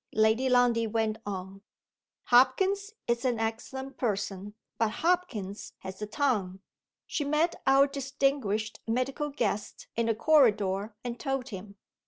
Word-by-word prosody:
Lady 220 +4 +3
Lundie 245 -2 +4
went 220 0 -1
on: 190 0 -5 0.6
"Hopkins 380 - +3
is 235 0 0
an 245 -3 +1
excellent 265 +4 -4
person 205 -3 -2 0.2
but 225 -1 +3
Hopkins 230 - -1
has 190 +2 -8
a 210 - -3
tongue. 210 -7 0 0.5
She 300 - -2
met 305 +4 +1
our 270 +1 +7
distinguished 270 -6 -1
medical 260 +5 -1
guest 245 -7 -2
in 230 0 +1
the 225 - +2
corridor, 215 -7 +3
and 240 -1 -5
told 270 -3 -2
him. 200 0 -8
235 Hz, 130 wpm, -29 LUFS, 210-275 Hz, 0.6 s, our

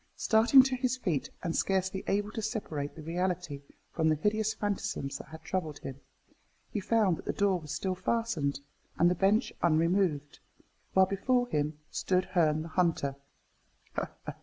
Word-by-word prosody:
Starting 230 +4 +6
to 265 -1 0
his 255 0 0
feet, 155 - -1
and 165 -2 -1
scarcely 190 0 0
able 205 +1 0
to 220 - -4
separate 160 - -3
the 155 - -9
reality 175 -3 -2 0.3
from 160 -1 +1
the 155 - +3
hideous 215 +6 +1
phantasms 200 -10 -3
that - - -10
had 160 0 -11
troubled 160 -6 -3
him, 135 -1 -8 0.7
he 210 - -1
found 200 -3 +2
that - - -11
the - - 0
door 195 -3 +1
was 150 -3 -9
still 190 -1 -1
fastened, 185 -8 -1 0.4
and 175 +1 +5
the - - +4
bench 200 +6 +2
unremoved, 165 -2 +1 0.6
while 190 0 +7
before 245 +6 +1
him 150 -2 -1
stood 185 -1 +1
Herne 155 -3 +2
the 165 - -8
Hunter. 160 -5 +1
185 Hz, 160 wpm, -30 LUFS, 155-210 Hz, 0.7 s, while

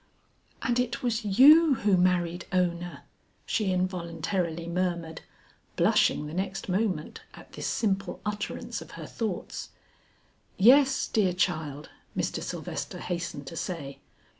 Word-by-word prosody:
"And 245 -1 +1
it 245 -1 -1
was 235 -2 0
you 280 +9 +7
who 210 -4 +2
married 175 -1 +1
Ona!" 175 -1 -1 0.4
she 210 -5 0
involuntarily 170 -2 -2
murmured, 170 -2 -2 0.5
blushing 150 - +3
the 150 - -7
next 190 +2 -3
moment 185 -4 -1
at - - -14
this - - -4
simple 195 -4 -1
utterance 210 0 -4
of - - -11
her - - -7
thoughts. 215 -6 -4 0.9
"Yes, 270 +6 +5
dear 195 -5 +2
child," 155 -5 -2 0.3
Mr. - - -1
Sylvester - - -5
hastened 170 -5 -4
to 150 - -8
say. 155 -5 -5
185 Hz, 120 wpm, -28 LUFS, 170-210 Hz, 0.9 s, you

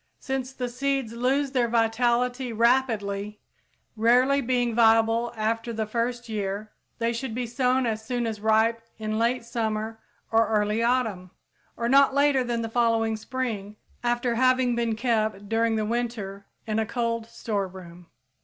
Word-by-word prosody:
_ - - -45 0.2
Since 265 -1 -3
the 250 -2 -3
seeds 270 -1 -2
lose 265 +4 0
their 250 -3 +2
vitality 240 +2 +1
rapidly, 215 -4 +1 0.6
rarely 250 +5 +4
being 245 -2 0
viable 225 +1 +4
after 225 +2 -1
the 220 -1 -2
first 240 +2 -2
year, 210 -1 -3 0.3
they 230 0 0
should 230 -1 -4
be 250 0 -2
sown 250 +2 +1
as 220 -1 -2
soon 240 +1 -2
as 220 -2 -4
ripe 220 +1 +3 0.2
in 215 0 -2
late 235 +1 +1
summer 220 -1 -3 0.3
or 225 0 +4
early 210 0 +1
autumn, 230 -7 0 0.5
or 235 - -1
not 275 +1 +5
later 280 -2 +3
than 235 -1 -2
the - - -2
following 225 -1 +1
spring 220 -3 -4 0.3
after 240 0 +1
having 255 0 +3
been 235 -2 0
kept 215 -4 -1
during 225 +1 +1
the 215 -1 0
winter 215 -4 -3 0.2
in 220 -1 -1
a 220 - +1
cold 230 -1 -2
storeroom. 185 -6 -5
230 Hz, 155 wpm, -26 LUFS, 220-245 Hz, 0.6 s, not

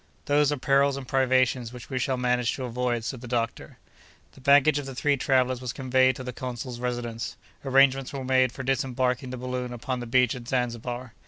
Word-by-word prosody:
"Those 145 -1 +3
are 145 - -1
perils 140 +1 +2
and 135 -2 -7
privations 130 -3 +2
which 125 0 -11
we 130 - -1
shall 130 +1 0
manage 125 -1 +1
to 130 - -5
avoid," 120 -1 -1
said 120 +1 -5
the 125 - -8
doctor. 115 -1 -3 0.5
The - - -17
baggage 145 +2 +5
of 140 - -6
the 135 - -7
three 145 +2 +2
travellers 130 -1 +1
was 125 -1 -4
conveyed 130 -1 +2
to 130 - -7
the 125 0 -6
consul's 125 -1 -6
residence. 120 -2 -4 0.3
Arrangements 135 -1 +3
were 135 -2 -5
made 130 -1 +3
for 130 - -7
disembarking 130 0 0
the 130 - -5
balloon 125 0 -4
upon 125 +1 -4
the 120 - -6
beach 125 +1 +3
at 125 -3 -9
Zanzibar. 125 -1 -3
130 Hz, 200 wpm, -26 LUFS, 125-135 Hz, 0.5 s, baggage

